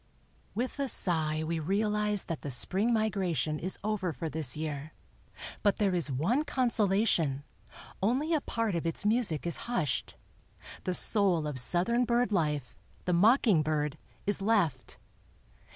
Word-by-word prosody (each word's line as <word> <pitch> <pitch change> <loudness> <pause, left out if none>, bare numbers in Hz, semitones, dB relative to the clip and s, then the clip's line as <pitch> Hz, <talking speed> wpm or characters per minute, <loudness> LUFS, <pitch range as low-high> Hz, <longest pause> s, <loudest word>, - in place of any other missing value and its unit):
With 250 +5 -3
a 275 -1 -1
sigh 155 -6 +5
we 165 +1 -2
realize 210 +4 0
that 165 - -5
the 145 - -5
spring 190 - +1
migration 185 - -1
is 185 +2 -3
over 205 -4 -1
for 160 +1 -5
this 150 -4 0
year; 155 -1 -5 0.7
but 205 - +2
there 200 -3 +1
is 170 -5 -1
one 185 - 0
consolation, 205 - 0 0.6
only 260 - 0
a 310 - +1
part 230 -5 -2
of 170 -1 -2
its 165 +4 -3
music 210 -9 +1
is 170 - -2
hushed—the 185 - -5
soul 190 -8 +3
of 145 -3 +1
Southern 205 - +1
bird 240 -1 +1
life, 150 -8 -1 0.3
the 180 - 0
mocking 210 - +4
bird, 150 -1 -2 0.3
is 205 0 -1
left. 180 - 0
185 Hz, 140 wpm, -29 LUFS, 155-220 Hz, 0.7 s, sigh